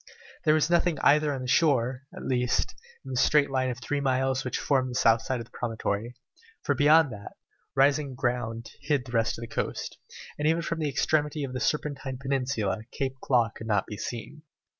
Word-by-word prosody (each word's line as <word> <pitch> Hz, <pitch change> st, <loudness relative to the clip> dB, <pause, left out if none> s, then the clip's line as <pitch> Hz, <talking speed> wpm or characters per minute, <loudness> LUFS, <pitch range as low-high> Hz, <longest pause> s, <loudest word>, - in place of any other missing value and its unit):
There 155 Hz, 0 st, +5 dB
was 155 Hz, 0 st, +3 dB
nothing 175 Hz, -2 st, +3 dB
either 150 Hz, +1 st, +4 dB
on 135 Hz, -2 st, -4 dB
the -, -, -5 dB
shore, 130 Hz, -2 st, +2 dB
at -, -, -9 dB
least, 125 Hz, -1 st, 0 dB, 0.3 s
in 135 Hz, -, -7 dB
the 130 Hz, -, -2 dB
straight 145 Hz, -2 st, +4 dB
line 130 Hz, -1 st, +1 dB
of 125 Hz, -, -3 dB
three 145 Hz, +3 st, -2 dB
miles 130 Hz, 0 st, +1 dB
which 130 Hz, -, -2 dB
formed 130 Hz, -3 st, +1 dB
the 125 Hz, -, -6 dB
south 115 Hz, -2 st, +4 dB
side 130 Hz, -2 st, -2 dB
of 115 Hz, -, -6 dB
the -, -, -26 dB
promontory, 115 Hz, 0 st, -3 dB, 0.5 s
for 145 Hz, -, +2 dB
beyond 145 Hz, +1 st, +5 dB
that, 100 Hz, -1 st, -9 dB, 0.4 s
rising 140 Hz, 0 st, +3 dB
ground 120 Hz, -2 st, -2 dB
hid 145 Hz, -3 st, 0 dB
the 120 Hz, -, -10 dB
rest 115 Hz, -2 st, +1 dB
of 115 Hz, -, -7 dB
the -, -, -5 dB
coast, 115 Hz, -, -4 dB, 0.4 s
and 150 Hz, -, +1 dB
even 165 Hz, +1 st, +2 dB
from 165 Hz, 0 st, -3 dB
the 155 Hz, -2 st, 0 dB
extremity 150 Hz, +2 st, 0 dB
of 130 Hz, -2 st, -4 dB
the 130 Hz, -, -3 dB
Serpentine 140 Hz, -2 st, -2 dB
Peninsula 130 Hz, -7 st, -1 dB
Cape 135 Hz, -1 st, -2 dB
Claw 120 Hz, -3 st, +2 dB
could 110 Hz, -, -8 dB
not 105 Hz, -3 st, +1 dB
be 105 Hz, -, -7 dB
seen. 120 Hz, +8 st, -6 dB
130 Hz, 205 wpm, -27 LUFS, 120-145 Hz, 0.5 s, There